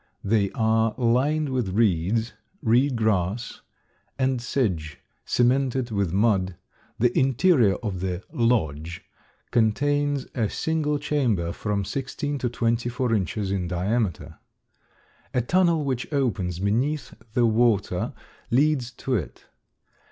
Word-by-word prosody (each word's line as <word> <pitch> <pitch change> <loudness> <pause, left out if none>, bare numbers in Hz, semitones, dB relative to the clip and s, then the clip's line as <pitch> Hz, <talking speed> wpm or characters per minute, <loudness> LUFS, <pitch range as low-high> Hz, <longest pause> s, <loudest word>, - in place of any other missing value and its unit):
They 100 -1 +2
are 110 0 +2
lined 135 +5 +2
with 120 -8 -1
reeds, 110 +2 +1 0.3
reed 125 +3 +3
grass, 110 0 -1 0.6
and 130 -2 +1
sedge, 90 - -1 0.3
cemented 125 0 +1
with 100 -5 0
mud; 95 -2 +2 0.4
the 120 +1 +2
interior 130 - +4
of 100 -5 -3
the 90 0 -3
"lodge" 85 - 0 0.5
contains 145 +4 +1
a 110 -5 0
single 155 -2 0
chamber 125 - 0
from 100 +1 -2
sixteen 140 - -3
to 125 - -1
twenty 115 0 0
four 125 -1 -1
inches 100 0 -1
in 95 -3 -1
diameter. 95 +3 -2 1.0
A 125 - +3
tunnel 170 +3 +2
which 130 0 -2
opens 100 - 0
beneath 120 +11 -1 0.2
the 120 -2 +4
water 115 -2 +1 0.4
leads 135 -1 +2
to 135 - -4
it. 95 - -3
115 Hz, 115 wpm, -25 LUFS, 100-130 Hz, 1.0 s, interior